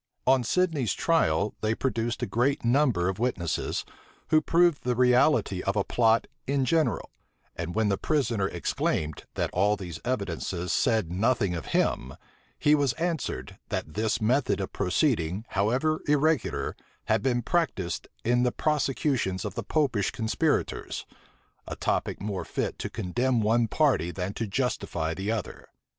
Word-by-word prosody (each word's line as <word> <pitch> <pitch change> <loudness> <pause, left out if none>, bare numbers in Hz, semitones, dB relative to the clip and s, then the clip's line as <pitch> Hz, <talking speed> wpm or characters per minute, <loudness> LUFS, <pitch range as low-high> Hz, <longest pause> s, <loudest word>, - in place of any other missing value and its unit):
On 130 -1 +4
Sidney's 150 - +1
trial, 105 - +2
they 110 +1 +1
produced 115 -3 -1
a - - +2
great 125 +3 0
number 120 -8 +3
of 95 +1 -2
witnesses, 95 -10 -1 0.4
who 155 -1 +5
proved 170 -1 +3
the 125 0 0
reality 125 -5 +3
of 100 - -1
a 100 - +2
plot 115 +1 +3 0.2
in 135 -1 +1
general; 160 +4 +1 0.4
and 85 +2 -5
when 110 -1 +2
the 100 - 0
prisoner 115 -10 +1
exclaimed, 80 -3 -2
that - - -1
all 105 +3 +3
these 90 -5 -7
evidences 95 -6 -2
said 110 -9 +1
nothing 100 0 +1
of 85 - -5
him, 65 +2 0 0.4
he 150 - +3
was 140 -4 +3
answered, 165 0 -3
that 75 - -3
this 110 +2 0
method 120 +3 +1
of 95 - -4
proceeding, 100 - 0
however 125 +11 +1
irregular, 150 +1 +1 0.3
had - - +2
been 120 -2 0
practised 115 - -1 0.2
in 120 +1 +2
the 125 0 +2
prosecutions 135 -10 0
of 100 - -4
the - - -3
Popish 135 -10 +1
conspirators; 110 -1 -1 0.6
a - - -4
topic - - -1
more 100 -1 -3
fit - - -3
to - - -3
condemn 120 +7 0
one 115 +2 +2
party 130 - +2
than 90 +2 -4
to 115 - -3
justify 95 -8 -1
the 95 +4 -4
other. 110 -4 -5
115 Hz, 150 wpm, -27 LUFS, 95-135 Hz, 0.6 s, who